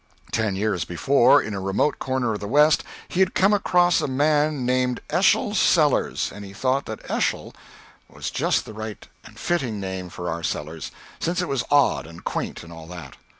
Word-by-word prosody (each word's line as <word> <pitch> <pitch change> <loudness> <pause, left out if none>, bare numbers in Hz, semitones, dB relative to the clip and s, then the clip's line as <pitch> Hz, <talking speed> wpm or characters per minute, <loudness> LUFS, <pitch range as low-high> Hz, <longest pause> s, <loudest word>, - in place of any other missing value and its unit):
Ten 110 -4 0
years 100 -3 0
before, 120 +9 +4
in 105 - -5
a 100 - -3
remote 95 +10 0
corner 130 -3 -1
of 105 - -4
the 100 - -5
West, 150 +6 +4 0.2
he 180 - -4
had 190 -1 +3
come 195 +2 +4
across 175 -3 +3
a - - -1
man 145 0 +1
named 125 0 +1
Eschol - - +3
Sellers, - - +2
and 105 - -9
he 100 -1 -10
thought 130 +6 0
that - - -7
Eschol - - -1 0.6
was - - -6
just - - 0
the - - -9
right 110 -1 -7 0.2
and - - -15
fitting 130 -12 -1
name 95 -2 -5
for 90 0 -7
our 85 0 -3
Sellers, 80 -2 -4 0.3
since 175 +2 -1
it 180 - -1
was 135 -3 -1
odd 145 - +3
and 85 +1 -12
quaint - - -4
and 85 0 -11
all 80 -1 -11
that. 85 -6 -9
115 Hz, 195 wpm, -23 LUFS, 95-145 Hz, 0.6 s, before